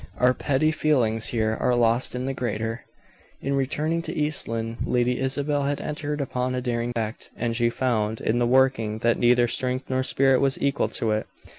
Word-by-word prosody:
Our 125 0 +4
petty 145 +4 +1
feelings 120 -9 +1
here 110 -2 0
are 125 - +2
lost 120 +1 +2
in 125 +1 -3
the 135 - -2
greater. 115 -1 -3 0.5
In 140 - -2
returning 150 +5 0
to - - -5
East 150 0 0
Lynne, 115 0 -3
Lady 125 0 +1
Isabel 140 +2 0
had 140 0 -1
entered 150 -1 -3
upon 130 -1 -2
a - - 0
daring 120 -1 -2
act, 110 -1 -4
and 115 0 -1
she 120 0 +2
found, 110 -3 -1
in 115 +2 0
the 120 - +2
working, 125 -4 +2
that 115 - +3
neither 120 0 +4
strength 130 +2 -2
nor 130 0 +1
spirit 135 0 +3
was 135 -1 +1
equal 140 0 +1
to 110 - -1
it. 110 0 -1
125 Hz, 190 wpm, -25 LUFS, 115-135 Hz, 0.5 s, Our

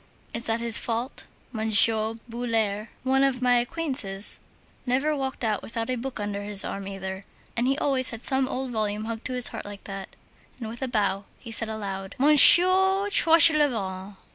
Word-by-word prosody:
Is 230 +1 -6
that 225 +1 -3
his 235 -1 +5
fault? 235 +3 -6 0.2
Monsieur 220 0 +1
Boulard, 225 -3 -4 0.2
one 265 +1 0
of 270 -2 -1
my 250 -1 +1
acquaintances, 245 -8 +5 0.4
never 270 +5 -2
walked 265 -3 -6
out 215 -3 -2
without 230 +2 -6
a - - -2
book 250 0 -7
under 205 -1 -6
his 205 -1 -2
arm 195 0 -8
either, 190 0 -8 0.3
and 240 +2 -2
he 270 +1 -1
always 270 -4 -1
had 230 0 -9
some 265 -4 +3
old 260 0 -6
volume 215 -1 -4
hugged 225 0 -8
to 255 - -4
his 250 -1 +3
heart 225 - -9
like 205 -1 -12
that." 195 -1 -10 0.4
And, 225 -3 -8
with 230 +1 -11
a 265 - -3
bow, 205 -4 -3
he 230 - -13
said 225 0 -2
aloud: 195 -3 -8
"Monsieur 370 +7 +5
Tranchelevent...." 275 - +2
230 Hz, 175 wpm, -23 LUFS, 210-265 Hz, 0.4 s, his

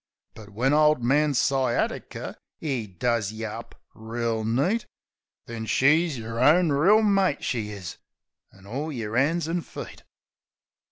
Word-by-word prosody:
But 105 -2 -12
when 125 +7 0
Ole 150 0 +5
Man 145 +4 +2
Sciatiker, 130 -2 -1 0.2
'e 130 -8 -3
does 105 +2 -1
yeh 110 +1 -6
up 115 +1 -10
reel 115 0 -3
neat, 140 - 0 0.6
Then 110 -1 -6
she's 155 +4 +3
yer 115 0 -5
own 160 +5 +5
reel 190 +10 +4
mate, 195 -7 +2
she 110 -4 -2
is, 95 -5 -7 0.5
an' 95 0 -19
all 140 +9 -4
yer 115 -5 -4
'ands 155 +5 +1
an' 170 +1 -1
feet. - - -9
125 Hz, 135 wpm, -25 LUFS, 110-155 Hz, 0.6 s, Ole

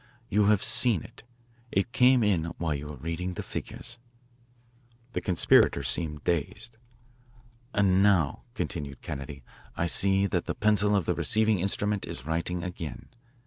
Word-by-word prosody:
You 105 0 +3
have 105 -1 +3
seen 115 - +3
it. - - -14 0.5
It 95 +4 0
came 125 0 +5
in 95 -6 +2
while 80 -3 -1
you 70 +1 -5
were 75 - -7
reading 85 +6 -4
the - - -5
figures." 120 0 -7 1.1
The - - -2
conspirators 75 - +3
seemed 75 +1 -1
dazed. 110 +8 -2 0.9
"And 95 -3 +3
now," 95 -8 +3
continued 75 -5 -4
Kennedy, 70 -2 -7 0.3
"I 85 - +1
see 95 +3 +3
that 100 - -1
the - - -3
pencil 105 -1 +2
of 95 -5 +1
the - - +1
receiving 110 -2 +2
instrument 100 +2 -1
is 65 - -7
writing 85 +2 -2
again. 85 -7 -7
90 Hz, 145 wpm, -28 LUFS, 80-105 Hz, 1.1 s, came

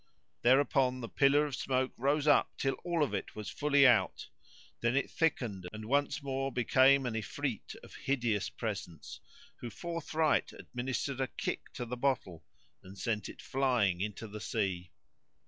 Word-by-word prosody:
Thereupon 130 0 +3
the 115 - -4
pillar 140 +4 +4
of 145 -3 -4
smoke 130 -1 -1
rose 140 +4 +1
up 145 -2 +3
till 135 0 0
all 170 -3 +1
of 125 -8 -2
it 100 - -4
was 105 -1 -6
fully 145 -1 +4
out; 120 -4 +3 0.5
then 120 +2 +1
it 140 - 0
thickened 115 - -1
and 110 0 -7
once 140 +4 0
more 135 0 -2
became 130 +2 +4
an 120 - -2
Ifrit 115 +3 -4
of - - -13
hideous 120 -7 -1
presence, 100 -8 -6 0.4
who 120 - -6
forthright 160 -1 -1
administered 130 +2 -4
a 130 - +1
kick - - -4
to 120 - -4
the 125 +1 -5
bottle 120 - -1 0.4
and 95 +1 -13
sent 105 +2 -2
it - - -11
flying 120 -9 +1
into 105 +2 -4
the 105 0 -8
sea. 95 -6 -2
130 Hz, 160 wpm, -32 LUFS, 110-140 Hz, 0.5 s, pillar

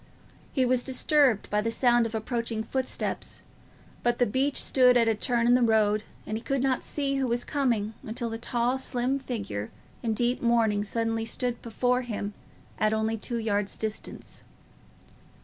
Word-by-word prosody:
He 260 -2 +2
was 250 0 +2
disturbed 265 -3 +3
by 210 0 +2
the 230 - -1
sound 240 0 +3
of 225 - -7
approaching 225 0 -2
footsteps, 260 +3 -3 0.6
but 240 0 +1
the 245 - +3
beech 270 +6 0
stood 250 -2 +5
at 230 -1 +3
a 225 - +4
turning 235 +2 +1
in - - +6
the 250 - +4
road, 215 -2 +3 0.2
and 215 - -3
he 220 - -3
could 275 -1 0
not 265 -2 +1
see 275 -2 -1
who 265 -1 0
was 240 0 0
coming 235 -7 0
until 230 +1 -4
the 225 - -4
tall 240 +2 0
slim 255 +1 0
figure 205 - -4 0.3
in 225 -2 -1
deep 245 +2 +1
mourning 225 -3 +2
suddenly 225 +1 -1
stood 245 +1 -2
before 250 +2 0
him 210 -4 -4 0.5
at 215 0 +2
only 220 +1 0
two 235 +2 -3
yards' 205 -3 -1
distance. 220 -1 -6
235 Hz, 170 wpm, -27 LUFS, 220-250 Hz, 0.6 s, in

